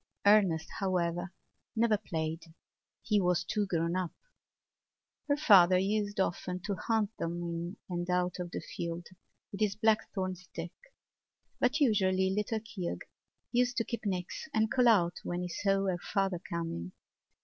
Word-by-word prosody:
Ernest, 195 -6 +5
however, 175 -2 0 0.4
never 225 -1 +3
played: 165 -5 -3 0.6
he 210 -2 +2
was 180 -2 +2
too 205 +3 -1
grown 170 -1 0
up. 185 -3 -1 1.2
Her 285 0 +2
father 190 - +7
used 205 +1 0
often 180 -1 -1
to 205 +2 -2
hunt 220 +1 0
them 170 +2 -3
in 175 -1 -2
out 180 0 0
of 175 -1 -3
the - - -5
field 170 0 -5 0.5
with 195 - -7
his 205 -2 +2
blackthorn 215 -3 +1
stick; 175 -1 -8 0.9
but 250 +5 +2
usually 190 -7 +3
little 210 +2 -1
Keogh 195 -5 -4 0.5
used 245 0 +2
to 230 - +3
keep 235 - -4
nix 185 - -3
and 220 0 +2
call 250 -2 +4
out 180 -7 +4
when 175 +1 -2
he 180 - -4
saw 195 +2 +1
her 185 -2 0
father 195 -2 -1
coming. 165 - -4
185 Hz, 145 wpm, -31 LUFS, 175-210 Hz, 1.2 s, father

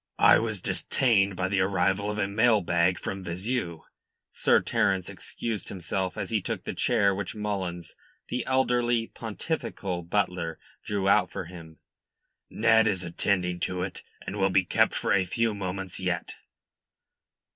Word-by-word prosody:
"I - - +7
was 110 -5 -3
detained 100 -7 +2
by 95 +1 -1
the 100 +1 0
arrival 95 +1 +1
of 105 - -3
a 100 -2 +1
mail 105 +2 +3
bag 85 +1 +2
from 95 -1 -5
Vizeu," 90 0 -3 0.5
Sir - - +3
Terence 95 -2 0
excused 110 -5 -5
himself, 95 +1 -3
as - - -4
he 110 -2 +1
took - - -4
the - - -4
chair 105 -5 +2
which 100 +1 -4
Mullins, 95 -5 -4 0.3
the 125 -1 -2
elderly, 120 -3 +2
pontifical 105 - -4
butler, 85 -2 -1 0.3
drew 100 -2 -1
out 100 -1 +4
for - - -5
him. 80 -2 -11 0.7
"Ned 110 0 +4
is 95 -4 0
attending 90 +1 0
to 90 0 -2
it, 95 - -5 0.2
and 100 - -5
will 95 -1 +3
be 95 0 +3
kept - - +2
for - - +1
a 95 0 +4
few 115 +5 0
moments 95 -1 -4
yet." 90 -2 -2
95 Hz, 155 wpm, -27 LUFS, 90-105 Hz, 0.7 s, I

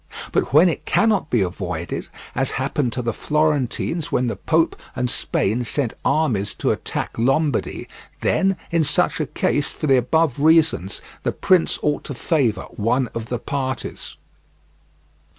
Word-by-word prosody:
But - - 0
when 155 +7 +7
it 170 - -2
cannot 210 -8 +2
be 120 - +2
avoided, 90 -2 -4 0.3
as 135 +1 0
happened 135 -1 -1
to 125 - -3
the 115 -1 -1
Florentines 150 +2 0
when 125 - +1
the 115 -3 -1
Pope 160 - +1 0.2
and 125 0 0
Spain 115 +5 0
sent 120 0 -1
armies 115 -11 +1
to - - 0
attack - - -3
Lombardy, 135 +2 0 0.3
then 195 -1 +2
in 170 -1 +3
such 150 - +1
a - - -1
case, - - 0
for - - -5
the 135 -3 +5
above 140 +2 +1
reasons, 160 - +3 0.2
the - - 0
prince 185 -3 +2
ought 150 -1 0
to 140 - -5
favour 120 - +1
one 120 +4 +1
of 115 -1 -4
the 120 - -1
parties. 130 0 -4
135 Hz, 150 wpm, -22 LUFS, 115-155 Hz, 0.3 s, when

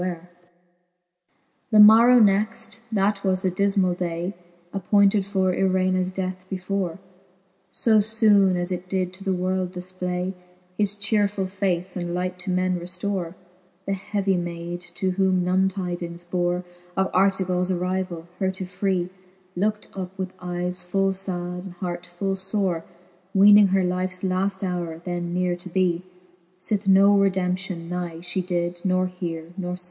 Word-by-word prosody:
weare^ 180 -2 -3
XI. - - -18 1.5
The 215 - +7
morrow 225 +4 +9
next, 215 +1 +2
that 200 -1 +1
was 190 -1 +1
the 185 - +1
difrnall 195 -1 +2
day. 175 +1 -3 0.4
Appointed 200 +1 +3
for 190 -2 +1
Irenas 185 0 +1
death 185 -1 -4
before, 190 -2 -2 0.7
So 220 -2 +3
Ibone 210 -3 +4
as 175 +1 -1
it 180 0 -4
did 185 -1 -1
to 190 +1 -11
the 195 - 0
world 185 0 -1
difplay 180 0 -3 0.4
His 205 0 0
chearefuU 205 -2 0
face, 185 -2 -2
and 175 -1 -3
light 180 0 -3
to 185 +2 -5
men 185 0 +1
reftore, 180 0 -3 0.5
The 195 - -1
heavy 195 0 -1
mayd, 175 0 -4
to 190 -1 0
whom 185 -1 +2
none 190 +1 +3
tydings 175 -2 -5
bore 175 0 0 0.3
Of 190 0 +1
Artevals 185 -1 +2
arryvall, 180 -1 -2
her 190 - +1
to 190 0 -5
free, 185 -1 -1 0.4
Lookt 210 +3 -1
up 190 0 -6
with 190 -1 -4
eyes 180 0 -2
full 195 +2 +1
fad 180 -1 -4
and 190 - -8
hart 175 0 -5
full 195 +2 -2
fore; 190 -3 -1 0.5
Weening 205 +1 +8
her 190 0 +2
lifes 185 +1 -2
laft 190 +1 0
howre 175 -3 -3
then 175 -1 -3
neare 180 0 0
to 180 +1 -10
bee, 180 -1 +1 0.6
S'ith 200 +2 -1
no 195 +1 +6
redemption 185 -2 0
nigh 175 -1 -4
fhe 180 +1 -2
did 175 -1 -2
not 185 -1 +1
heare 165 -2 -4
nor 180 -1 -3
fee. - - -3
185 Hz, 150 wpm, -24 LUFS, 180-195 Hz, 1.5 s, morrow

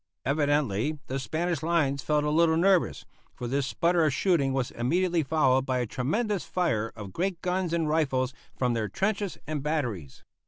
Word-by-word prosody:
Evidently 145 -2 +1
the 135 -1 -3
Spanish 160 +3 -2
lines 155 -5 +1
felt 150 +2 +1
a 150 - 0
little 160 +1 +4
nervous, 185 +1 +2 0.3
for 125 - -6
this 135 +2 0
sputter 170 +9 +2
of 155 - +3
shooting 145 -3 +2
was 130 -2 -1
immediately 170 +8 +1
followed 135 -3 +2
by 130 -1 -1
a 125 - 0
tremendous 195 - -1
fire 115 -12 -1
of 105 -4 -8
great 185 0 -1
guns 180 -1 0
and 165 -2 0
rifles 135 -5 +1 0.2
from 125 -2 +1
their 110 -3 -1
trenches 200 - -1
and 155 -2 -3
batteries. 125 - -3
150 Hz, 170 wpm, -27 LUFS, 130-170 Hz, 0.3 s, little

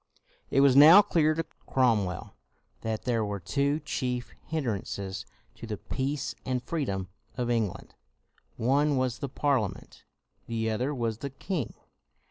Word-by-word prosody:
It 135 - +3
was 140 -2 +6
now 160 +8 +10
clear 155 -5 +2
to 165 0 -2 0.2
Cromwell 110 -8 +1 0.5
that 110 -1 -3
there 115 -3 +1
were 100 -1 -3
two 140 - 0
chief 125 -4 -3
hindrances 100 -9 -3 0.3
to 115 - -10
the 105 -1 -3
peace 135 +5 -3
and 125 -1 -2
freedom 100 - -2 0.3
of 120 -1 0
England; 110 -5 -2 0.6
one 140 +4 +2
was 130 -2 0
the 140 - -3
Parlia 130 -7 +1
ment, - - -16 0.4
the 115 -1 -1
other 125 +6 -1
was 115 -3 -2
the 140 - -4
king. 170 +5 -4
125 Hz, 140 wpm, -28 LUFS, 110-145 Hz, 0.6 s, now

